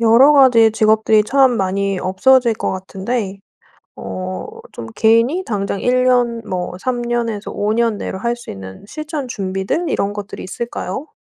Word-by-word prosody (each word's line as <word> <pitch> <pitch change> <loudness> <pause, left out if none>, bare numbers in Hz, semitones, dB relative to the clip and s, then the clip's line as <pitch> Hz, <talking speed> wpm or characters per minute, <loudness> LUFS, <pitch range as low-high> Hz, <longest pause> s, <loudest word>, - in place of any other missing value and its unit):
여러 235 +6 +6
가지 245 -6 +6
직업들이 220 0 +3
참 265 0 +3
많이 195 0 -1
없어질 235 +7 +3
것 - - -2
같은데 195 +2 -4 0.6
어 95 -1 -6 0.5
좀 115 - -8
개인이 230 +11 +3
당장 200 -2 -2
1 255 +1 +2
년 245 -2 +2
뭐 180 -2 -4
3 245 +4 -2
년에서 235 -3 -2
5 210 +1 -1
년 230 -1 +1
내로 190 - -5
할 235 +4 -1
수 240 - -10
있는 95 - -10
실천 305 +2 -5
준비들 195 - -2
이런 200 +1 -1
것들이 205 -1 -7
있을까요? 235 - -5
220 Hz, 275 characters per minute, -18 LUFS, 195-245 Hz, 0.6 s, 여러